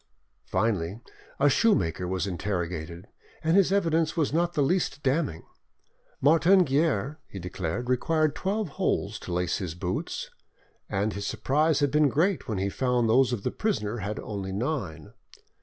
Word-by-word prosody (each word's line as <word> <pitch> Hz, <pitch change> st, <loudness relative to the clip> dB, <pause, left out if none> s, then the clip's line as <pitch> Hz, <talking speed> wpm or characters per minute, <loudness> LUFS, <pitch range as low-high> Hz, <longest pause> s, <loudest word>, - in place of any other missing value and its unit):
Finally, 95 Hz, -1 st, 0 dB, 0.4 s
a 140 Hz, -, +5 dB
shoemaker 95 Hz, -, +2 dB
was 95 Hz, +1 st, -1 dB
interrogated, 85 Hz, -3 st, -4 dB, 0.4 s
and 160 Hz, +2 st, +3 dB
his 195 Hz, -2 st, +4 dB
evidence 165 Hz, -4 st, +1 dB
was 150 Hz, -3 st, +1 dB
not 170 Hz, +2 st, +1 dB
the 145 Hz, -, +3 dB
least 150 Hz, -1 st, 0 dB
damning. 135 Hz, -, 0 dB, 0.8 s
Martin 165 Hz, +6 st, +5 dB
Guerre, 150 Hz, +1 st, 0 dB
he -, -, -9 dB
declared, 90 Hz, +5 st, -4 dB
required 155 Hz, +4 st, +1 dB
twelve 195 Hz, +3 st, -2 dB
holes -, -, -1 dB
to -, -, -8 dB
lace 90 Hz, 0 st, 0 dB
his 90 Hz, -5 st, -4 dB
boots, 90 Hz, +1 st, -4 dB, 0.6 s
and 100 Hz, +2 st, 0 dB
his 100 Hz, +1 st, -4 dB
surprise 150 Hz, +3 st, +1 dB
had 145 Hz, -2 st, +2 dB
been 150 Hz, 0 st, +4 dB
great 170 Hz, +7 st, +1 dB
when 110 Hz, -, -2 dB
he 95 Hz, +1 st, 0 dB
found 125 Hz, +2 st, +1 dB
those 125 Hz, +3 st, +4 dB
of 115 Hz, -5 st, -3 dB
the -, -, -1 dB
prisoner 120 Hz, -, -1 dB
had 105 Hz, +1 st, -4 dB
only 100 Hz, -3 st, -5 dB
nine. 100 Hz, -, -3 dB
125 Hz, 155 wpm, -27 LUFS, 95-160 Hz, 0.8 s, a